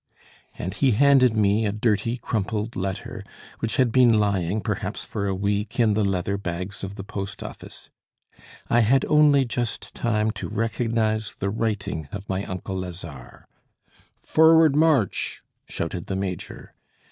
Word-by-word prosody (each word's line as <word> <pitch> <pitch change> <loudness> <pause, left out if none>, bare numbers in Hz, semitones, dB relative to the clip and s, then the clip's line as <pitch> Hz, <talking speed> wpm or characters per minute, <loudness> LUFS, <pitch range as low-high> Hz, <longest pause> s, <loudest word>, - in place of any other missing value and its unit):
And 90 - -4
he 135 -4 +2
handed 130 -1 +5
me 105 +1 +3
a - - 0
dirty 110 +2 0
crumpled 110 -1 -3
letter, 95 0 -4 0.4
which 115 - -2
had 130 -3 +3
been 125 0 +5
lying 100 -1 0
perhaps 105 -1 -3
for 100 -2 -3
a 95 - -1
week 100 +3 -2
in 110 -3 +4
the 105 +1 +1
leather 100 0 -1
bags 90 +2 -5
of 95 +1 -5
the 95 - -7
post 100 -1 -6
office. - - -10 0.8
I 120 - +3
had 120 +4 +3
only 150 -3 +5
just 120 -1 -4
time 110 -2 0
to 95 - -6
recognise 110 0 -1
the 100 - -2
writing 100 -8 -2
of 100 0 -7
my 95 +1 -2
uncle 95 -1 -5
Lazare. 85 -8 -9 0.7
"Forward, 160 -2 +5
march!" 150 - +1 0.2
shouted 85 +1 -4
the 95 - -2
major. 95 -3 -5
105 Hz, 145 wpm, -24 LUFS, 95-115 Hz, 0.8 s, handed